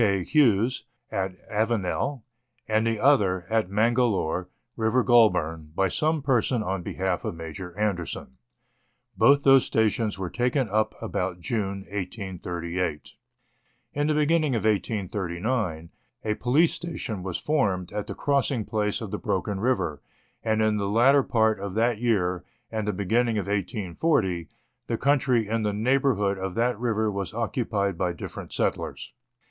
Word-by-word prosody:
K. 100 -4 +2
Hughes, 125 - +2 0.3
at 95 -1 -2
Avenel, 115 +4 -1 0.4
and 110 +1 +2
the 115 -2 0
other, 100 -10 +3
at 110 -4 +1
Mangalore, 105 -5 +1 0.3
River 115 +2 +2
Goulburn, 80 -10 +3
by 95 +1 +2
some 155 - 0
person 125 -3 +1
on 95 -2 -2
behalf 95 +1 -2
of - - -3
Major 85 +3 -8
Anderson. 90 -10 -3 0.8
Both 140 0 +5
those 135 -1 +7
stations 110 -1 0
were 95 -2 -4
taken 125 +1 +1
up 110 +2 0
about 90 -1 -2
June 100 -2 -2
1838. 90 -4 -4 0.8
In 145 +1 0
the 155 - +2
beginning 150 -2 +2
of 110 - 0
1839, 95 -3 -1 0.3
a 105 - +1
police 130 +10 +2
station 115 - -5
was 90 -1 -3
formed 100 - 0
at 105 0 -4
the - - -5
crossing 140 -5 0
place 105 -1 -1
of - - -6
the - - -3
Broken 100 -2 -2
River, 105 - 0 0.4
and 110 -1 +1
in 110 -1 +2
the 100 -1 -1
latter 130 +6 +5
part 110 -4 +2
of 100 -1 -5
that 115 0 +2
year, 90 -7 +1 0.3
and 110 -2 -2
the - - +2
beginning 110 +4 +1
of 100 - -1
1840, 100 - -1 0.4
the 115 - -1
country 130 -5 +2
in 115 +1 0
the 105 -1 0
neighbour 130 +5 +2
hood 100 -1 0
of 95 -1 -4
that 120 -1 +1
river 110 -3 0
was 100 +1 -4
occupied 105 -5 -1
by 90 -1 +1
different 85 - -8
settlers. - - -2
105 Hz, 150 wpm, -26 LUFS, 95-120 Hz, 0.8 s, those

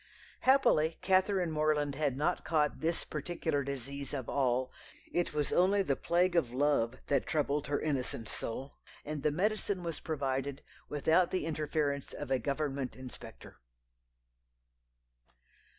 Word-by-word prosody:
Happily 170 - +4
Catherine 185 -2 +3
Morland 150 -2 +1
had 140 -2 0
not 165 +5 0
caught 150 -3 +1
this 165 +1 0
particular 155 -1 -2
disease 140 +1 -5
of 130 -4 -4
all 130 -1 +1 0.4
it 175 - +1
was 150 -1 -1
only 195 +3 +4
the 140 -7 +1
plague 175 +5 +2
of 135 -9 +2
love 130 -3 +2
that 140 -2 +1
troubled 150 -1 0
her 145 - 0
innocent 130 -6 -2
soul, 130 +6 -5 0.3
and 150 -1 -4
the 150 - +3
medicine 200 +2 0
was 165 -2 -3
provided 135 -2 -2 0.3
without 160 +4 +3
the 185 -5 -1
interference 150 -2 -1
of - - -6
a 130 - +3
Government 140 0 -2
inspector. 130 -1 -10
150 Hz, 135 wpm, -32 LUFS, 135-165 Hz, 0.4 s, Happily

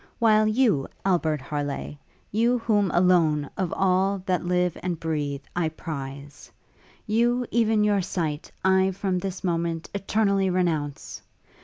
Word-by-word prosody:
While 215 -2 +4
you, 215 - +2 0.2
Albert 160 -6 +1
Harleigh, 145 +1 -4 0.4
you 235 +4 +2
whom 210 -4 +1
alone, 170 -5 +3
of 185 -3 -2
all 190 0 +1
that 185 -3 0
live 180 -1 +1
and 175 -3 -3
breath, 145 -3 -2
I 170 -2 +1
prize, 140 -3 -8 0.5
you, 240 +3 +1
even 220 -2 +2
your 205 -2 +2
sight, 165 -4 -3
I, 190 0 +4
from 185 -1 -1
this 190 0 -5
moment, 170 -2 -2
eternally 200 -1 +1
renounce! 165 -6 -2
180 Hz, 130 wpm, -25 LUFS, 160-200 Hz, 0.5 s, While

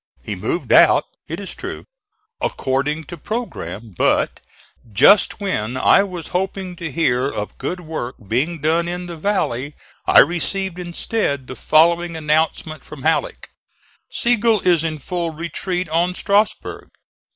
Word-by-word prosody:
He - - -4
moved - - -1
out, - - +6 0.2
it - - -5
is - - -6
true, - - -7 0.6
according 140 +4 -1
to 170 +4 -9
programme; 150 - -5
but - - +1 0.5
just 165 - +5
when 130 - -2
I 165 - +5
was 180 -5 -5
hoping 185 0 -2
to 165 -3 -5
hear 135 -3 +1
of 105 -6 -6
good 180 0 -3
work 155 -7 -5
being 140 - 0
done 165 +3 +2
in 180 +1 -4
the 175 -1 -7
valley 150 - -1 0.3
I - - +5
received 180 +1 -1
instead 175 - -2
the 130 - -8
following 170 +3 +3
announcement 155 0 0
from 145 -3 -11
Halleck: 160 +1 -1 0.6
"Sigel 230 -3 +2
is 175 -3 +3
in 160 -1 -2
full 170 +3 -3
retreat 175 +2 -3
on 175 +3 +1
Strasburg. 205 +3 0
170 Hz, 140 wpm, -20 LUFS, 150-180 Hz, 0.6 s, out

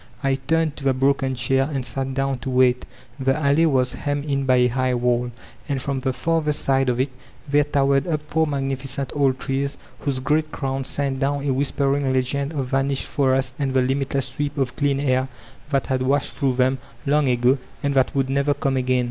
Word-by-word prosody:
I 135 0 +2
tamed 155 +3 0
to 140 - -8
the 135 -1 +2
broken 135 0 +1
chair, 135 +3 +1
and 135 -3 -2
sat 135 +1 -3
down 135 -1 0
to 135 - -5
wait 125 -1 +3 0.3
The 135 +1 +1
alley 155 +2 +3
was 130 -4 +1
hemmed 145 0 -2
in 140 -2 -1
by 130 - +5
a 125 0 +4
hig^ 130 0 0
wall, 120 0 +1 0.4
and 140 -1 0
from 135 +1 -2
the 130 0 -1
farther 155 +3 0
side 135 -2 +1
of 125 0 0
it 130 +1 0 0.4
there 145 +1 +3
towered 140 -1 +2
up 155 -3 -1
four 160 +1 0
magnificent 135 -1 -2
old 135 -2 +2
trees, 140 +1 -2 0.2
whose 140 -3 -1
great 155 +4 0
crowns 135 -1 -3
sent 140 -2 -1
down 140 +1 0
a 135 - +1
whispering 140 0 0
legend 135 +2 0
of 140 -4 -2
vanished 135 0 0
forests 130 -2 +1
and 135 -2 -1
the 130 - +5
limitless 135 0 -1
sweep 145 +2 -3
of 135 -3 -1
clean 140 -1 +1
air 130 -2 +1 0.4
that 135 -3 0
bad 130 -1 0
washed 135 +2 +1
through 135 -4 0
them, 130 +1 +2 0.3
long 145 0 +2
ago, 125 +2 +3 0.2
and 140 0 +1
that 130 0 +2
would 135 -1 +1
never 140 +2 +1
come 135 -1 0
again. 130 0 +1
135 Hz, 205 wpm, -22 LUFS, 130-140 Hz, 0.4 s, by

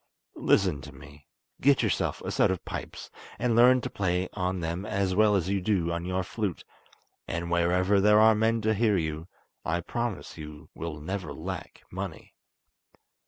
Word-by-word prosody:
Listen 90 -8 +3
to 75 - -10
me; 70 +2 -15 0.3
get 140 0 +4
yourself - - 0
a - - -4
set - - +3
of 95 -1 -3
pipes, - - -7 0.3
and 120 -2 +1
learn 125 +2 +6
to - - -4
play 90 -1 0
on 90 -1 -1
them 85 +2 -3
as 100 -2 -1
well 105 +1 +4
as 90 -3 0
you 100 0 0
do 90 -4 +1
on 85 +1 -3
your 95 +1 -1
flute, 100 -2 -3 0.6
and 85 +1 -3
wherever 90 +3 +3
there 105 +1 +6
are 110 +1 +7
men 110 +1 +1
to 110 +1 +2
hear 105 -1 +2
you, 80 0 -3 0.4
I 85 +1 0
promise 120 -3 -4
you 75 -1 -10
will 80 -2 -6
never 90 +3 -4
lack 90 +2 -7
money." - - -6
95 Hz, 170 wpm, -28 LUFS, 85-105 Hz, 0.6 s, are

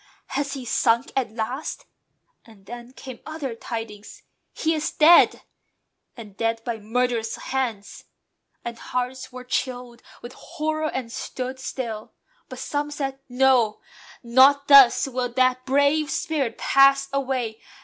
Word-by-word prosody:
"Has 280 0 -2
he 265 -3 -6
sunk 235 +2 +1
at 265 -2 0
last?" 245 +6 -5 0.6
And 215 -4 -19
then 240 +3 -9
came 260 -2 -10
other 310 -6 -5
tidings; 225 -2 -8 0.3
"He 320 +1 -1
is 310 -1 -1
dead! 325 +3 +5 0.7
And 210 -4 -11
dead 225 +1 -1
by 235 -2 -3
murderous 230 +1 -1
hands!" 235 -7 -4 0.6
And 235 -1 -6
hearts 250 +1 -4
were 250 0 -9
chilled 250 -1 -4 0.2
With 240 +1 -9
horror, 310 0 -3
and 250 -3 -5
stood 255 +2 -5
still. 230 -5 -6 0.4
But - - -8
some 290 0 -3
said, 270 -2 -4
"No! 250 -4 +3 0.4
Not 270 +4 +5
thus 275 -2 +7
will 250 -1 -2
that 255 0 +1
brave 285 +3 +2
spirit 290 -9 -2
pass 275 0 +4
away. 255 -5 -2
255 Hz, 130 wpm, -23 LUFS, 235-275 Hz, 0.7 s, thus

